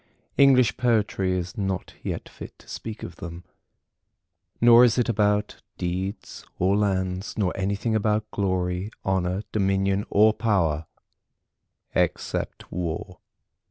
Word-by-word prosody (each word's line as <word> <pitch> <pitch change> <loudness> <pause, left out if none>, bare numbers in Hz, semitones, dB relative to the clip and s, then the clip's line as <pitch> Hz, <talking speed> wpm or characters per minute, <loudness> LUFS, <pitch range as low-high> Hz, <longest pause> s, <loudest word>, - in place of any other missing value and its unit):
English 130 -5 +5
Poetry 105 -6 +1
is 90 +3 -5
not 95 -4 -3
yet - - -4
fit - - -11
to - - -20
speak 110 -1 -7
of 85 - -8
them. 85 -1 -8 1.2
Nor 120 +1 +8
is 120 -1 +4
it 125 - +2
about 105 -2 +1 0.2
deeds 95 +3 -4
or 95 +2 +2
lands, 95 -2 -1
nor 95 -4 0
anything 100 +4 -1
about 110 0 0
glory, 95 -1 -1 0.2
honour, 95 +1 0
dominion 95 0 +1
or 110 +2 +5
power, 85 -9 0 1.1
except - - -2
War. 90 +1 -4
100 Hz, 120 wpm, -25 LUFS, 90-110 Hz, 1.2 s, Nor